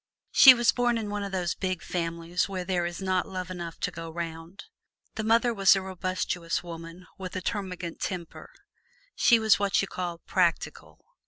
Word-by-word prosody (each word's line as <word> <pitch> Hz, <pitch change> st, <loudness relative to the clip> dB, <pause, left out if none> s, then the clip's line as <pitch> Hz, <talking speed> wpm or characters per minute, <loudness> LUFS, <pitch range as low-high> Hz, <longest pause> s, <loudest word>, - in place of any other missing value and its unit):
She 260 Hz, -2 st, +9 dB
was 240 Hz, -1 st, +3 dB
born 245 Hz, -1 st, +1 dB
into 210 Hz, -2 st, -4 dB
one 205 Hz, 0 st, -3 dB
of 200 Hz, -1 st, -4 dB
those 180 Hz, -2 st, -1 dB
big 185 Hz, -3 st, -3 dB
families 170 Hz, +1 st, -2 dB
where 185 Hz, -2 st, -4 dB
there 180 Hz, -2 st, 0 dB
is 175 Hz, +2 st, -6 dB
not 185 Hz, -1 st, 0 dB
love 185 Hz, -1 st, -5 dB
enough 170 Hz, -2 st, -7 dB
to -, -, -1 dB
go 165 Hz, 0 st, -7 dB
'round. 165 Hz, +2 st, -7 dB, 0.5 s
The 220 Hz, -, -4 dB
mother 230 Hz, +2 st, +3 dB
was 195 Hz, -2 st, +5 dB
a 195 Hz, -, -1 dB
robustious 185 Hz, -2 st, -3 dB
woman 165 Hz, +1 st, -9 dB
with 185 Hz, 0 st, -7 dB
a -, -, -1 dB
termagant 180 Hz, -3 st, -4 dB
temper; 175 Hz, -3 st, -6 dB, 0.6 s
she 235 Hz, -, +5 dB
was 220 Hz, -2 st, +3 dB
what 200 Hz, -3 st, +1 dB
you -, -, -3 dB
call 175 Hz, -2 st, -4 dB
"practical." 170 Hz, 0 st, -2 dB
185 Hz, 180 wpm, -27 LUFS, 170-195 Hz, 0.6 s, She